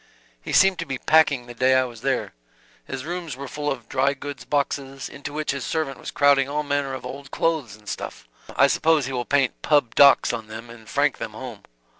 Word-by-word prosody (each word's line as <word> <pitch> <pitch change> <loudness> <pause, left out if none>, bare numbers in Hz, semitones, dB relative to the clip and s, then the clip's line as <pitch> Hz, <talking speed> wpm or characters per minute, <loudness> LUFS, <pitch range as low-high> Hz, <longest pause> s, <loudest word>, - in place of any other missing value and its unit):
"He - - -6
seemed 190 -1 +5
to 170 - -4
be 135 - -3
packing 145 -4 +3
the 120 - -9
day 130 +2 +3
I 130 - +4
was 120 -3 -8
there. - - -1 0.5
His 135 0 -5
rooms 170 -4 -5
were 140 0 -6
full 145 +2 -3
of 125 -4 -6
dry 135 +1 +1
goods 145 0 -8
boxes, 140 -2 -2
into 140 +1 -8
which 150 +1 -2
his 140 -2 -4
servant 145 -5 -2
was - - -7
crowding 140 -1 +3
all 150 +1 -1
manner 140 -2 -1
of - - -8
old 140 0 -8
clothes 150 -12 -1
and 105 -1 -21
stuff: - - -6 0.3
I - - +6
suppose 160 -3 +3
he 135 - -4
will 120 -1 -2
paint 135 -1 +1
'Pub. 145 -7 +2
Docs' 140 -3 +6
on 115 -2 -5
them 110 +2 -9
and 110 -2 -13
frank - - +1
them - - -5
home. - - -9
135 Hz, 220 wpm, -24 LUFS, 125-145 Hz, 0.5 s, I